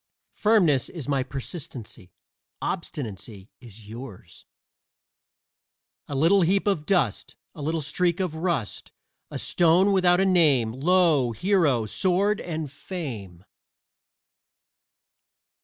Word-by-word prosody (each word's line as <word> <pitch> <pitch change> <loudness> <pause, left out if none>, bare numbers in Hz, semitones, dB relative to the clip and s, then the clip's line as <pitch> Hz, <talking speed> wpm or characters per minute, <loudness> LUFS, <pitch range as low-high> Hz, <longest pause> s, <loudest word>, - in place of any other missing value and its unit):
Firmness 180 - +2
is 160 -7 -7
my 140 -2 +1
persistency; 130 - -8 0.5
obstinacy 110 - -6
is 110 -3 -13
yours. 105 -7 -11 1.6
A 145 - -5
little 170 +8 +4
heap 190 +3 +2
of 170 -7 0
dust, 170 - 0 0.2
A - - -10
little 160 +2 -2
streak 170 +4 0
of 180 -4 -1
rust, 160 - -3 0.4
A - - -6
stone 175 +4 +3
without 180 -2 +3
a 195 - +3
name 150 -11 +3
Lo! 150 -2 +2
hero, 145 - +2
sword 190 - +1
and 155 -4 -5
fame. 115 - -7
155 Hz, 105 wpm, -25 LUFS, 120-180 Hz, 1.6 s, little